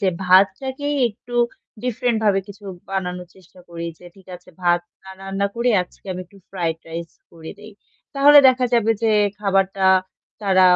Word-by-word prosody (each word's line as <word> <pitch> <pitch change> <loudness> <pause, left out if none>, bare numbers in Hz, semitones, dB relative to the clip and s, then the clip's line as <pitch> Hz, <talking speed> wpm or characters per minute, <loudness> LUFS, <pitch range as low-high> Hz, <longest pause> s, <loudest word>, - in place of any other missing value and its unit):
যে 190 - +3 0.2
ভাতটাকেই 265 +10 +2
একটু 240 +3 -13 0.5
ডিফরেন্ট 250 0 -1
ভাবে 200 -2 +3
কিছু 200 +1 -13 0.3
বানানোর 180 -2 -4
চেষ্টা 185 0 -20
করি। 170 0 -6
যে 180 - -18
ঠিক 190 - -19
আছে 180 - -24
ভাত 175 0 +3 0.2
না 190 - -12
রান্না 195 +1 -2
করে 240 +1 +1
আজকে 180 - -19
আমি 185 - -6
একটু 200 +3 -21
ফ্রাইড 170 -4 -2
রাইস 165 0 -6 0.2
করে 160 -1 -11
দেই। 210 +1 -13 0.4
তাহলে 290 +1 +7
দেখা 255 0 +2
যাবে 225 -2 +2
যে, 225 - +2 0.3
খাবারটা 195 -1 +1 0.6
তারা 190 -1 +4
195 Hz, 160 wpm, -21 LUFS, 180-230 Hz, 0.6 s, তাহলে